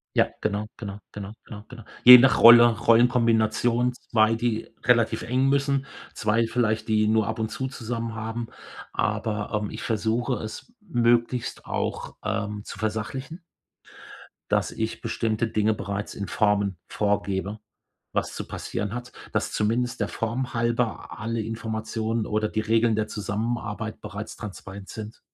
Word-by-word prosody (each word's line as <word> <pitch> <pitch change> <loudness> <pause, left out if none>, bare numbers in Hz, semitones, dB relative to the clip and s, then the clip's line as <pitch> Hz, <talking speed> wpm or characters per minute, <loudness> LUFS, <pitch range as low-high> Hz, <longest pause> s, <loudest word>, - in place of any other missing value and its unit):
Ja, - - +4
genau, 105 0 -1
genau, 100 -2 -7
genau, 100 0 -6
genau, 105 -1 -9
genau. 120 -3 -10 0.2
Je 125 0 +13
nach 125 +1 +5
Rolle, 120 0 +10
Rollenkombination 115 +1 +3
2, 115 -2 +2
die 115 -1 -2
relativ 115 -2 +3
eng 130 +2 +1
müssen, 140 0 +1 0.3
2 115 +2 +1
vielleicht, 115 -2 0
die 110 0 +3
nur 110 -1 +2
ab 110 0 -3
und 110 - 0
zu 130 - -3
zusammen 115 -2 -4
haben. 115 +1 -4 0.4
Aber, 105 -1 -1
ähm, 105 - -3
ich - - -7
versuche 115 +3 0
es 110 - -8
möglichst 120 - +1
auch, - - -3
ähm, 105 -1 -2
zu - - -8
versachlichen 125 - -4 1.1
dass - - +2
ich 110 0 -3
bestimmte 115 0 -1
Dinge 110 0 +1
bereits 100 0 -4
in 100 - -5
Formen 100 -3 +1
vorgebe, 100 0 -1 0.5
was - - -2
zu - - -5
passieren 105 +2 -4
hat, 125 0 -6 0.2
dass - - -1
zumindest 115 +2 0
der 105 - 0
Form 120 +3 -3
halber 120 0 -1
alle 115 +1 -2
Informationen 110 0 -3
oder 110 0 0
die 110 - -2
Regeln 110 0 +2
der 105 0 0
Zusammenarbeit 110 +1 -3
bereits 105 0 -7
transparent 100 -1 -9
sind. 110 +1 -8
110 Hz, 145 wpm, -25 LUFS, 105-120 Hz, 1.1 s, Je